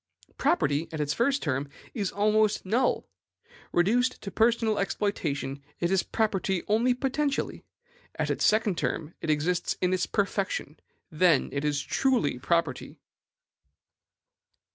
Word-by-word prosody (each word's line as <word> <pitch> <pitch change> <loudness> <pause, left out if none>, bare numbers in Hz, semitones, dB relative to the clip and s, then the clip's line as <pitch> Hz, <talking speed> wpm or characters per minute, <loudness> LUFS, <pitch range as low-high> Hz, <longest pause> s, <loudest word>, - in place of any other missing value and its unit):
Property, 165 - +1
at 160 - -5
its 150 -1 0
first 275 +4 +1
term, 140 0 -1 0.2
is 205 -6 -2
almost 215 0 +2
null. 235 +7 +1 0.7
Reduced 235 +9 +2
to 195 - -5
personal 225 -1 +2
exploitation, 150 -9 -2 0.2
it 170 +1 0
is 190 -2 +3
property 195 -4 -1
only 235 +4 +3
potentially. 275 +2 -1 0.5
At - - -1
its - - -1
second 210 -4 +3
term, 160 +1 -2
it - - -4
exists 170 +4 0
in 180 0 +1
its 185 - 0
perfection; 195 -6 -2 0.3
then 165 -2 +3
it 140 0 -2
is 145 -2 0
truly 240 - +1
property. 165 -2 -1
190 Hz, 125 wpm, -27 LUFS, 155-225 Hz, 0.7 s, is